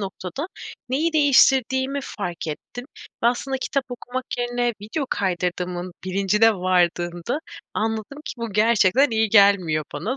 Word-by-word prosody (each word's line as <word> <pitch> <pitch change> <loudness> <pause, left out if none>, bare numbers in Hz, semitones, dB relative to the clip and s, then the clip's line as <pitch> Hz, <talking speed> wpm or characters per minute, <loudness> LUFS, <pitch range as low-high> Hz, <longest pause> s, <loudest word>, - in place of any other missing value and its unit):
noktada 195 - -5 0.4
neyi 310 +6 0
değiştirdiğimi 270 -2 +3
fark 180 -10 -5
ettim. 200 +10 -7 0.4
Ve 235 - +4
aslında 265 +3 0
kitap 275 +1 -1
okumak 250 +1 -5
yerine 245 0 0
video 260 +7 -3
kaydırdığımın 180 -1 -2
bilincine 200 +4 +3
vardığında, 175 - 0 0.4
anladım 220 +5 -2
ki - - -5
bu 230 -3 -5
gerçekten 225 +4 +4
iyi 220 -1 +1
gelmiyor 200 -7 +4
bana. 205 - -3
220 Hz, 125 wpm, -23 LUFS, 185-255 Hz, 0.4 s, Ve